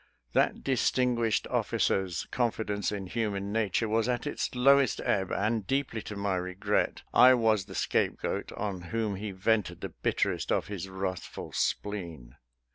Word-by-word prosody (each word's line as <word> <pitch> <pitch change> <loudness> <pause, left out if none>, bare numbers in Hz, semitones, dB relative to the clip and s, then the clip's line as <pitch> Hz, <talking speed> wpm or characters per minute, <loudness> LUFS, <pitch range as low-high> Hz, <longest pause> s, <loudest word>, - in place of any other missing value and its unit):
That - - +2
distinguished 125 -4 +1
officer's 95 -3 0
confidence 110 -4 -1
in 100 -2 -4
human 100 -1 -2
nature 110 0 +1
was 110 +2 +1
at 120 +1 -1
its 145 - -3
lowest 135 0 +4
ebb, 95 -2 +1
and, 105 0 0
deeply 135 -4 -1
to 105 - -7
my 100 -2 -1
regret, 90 +1 -1
I 130 +2 +8
was 110 -5 +2
the - - -10
scape - - 0
goat - - -3
on 100 -3 -3
whom 110 -3 -1
he 105 +2 -4
vented 95 -1 0
the - - -4
bitterest - - -1
of - - +1
his 95 -2 -5
wrathful 95 -1 -5
spleen. 85 -12 -3
105 Hz, 150 wpm, -29 LUFS, 95-115 Hz, -, I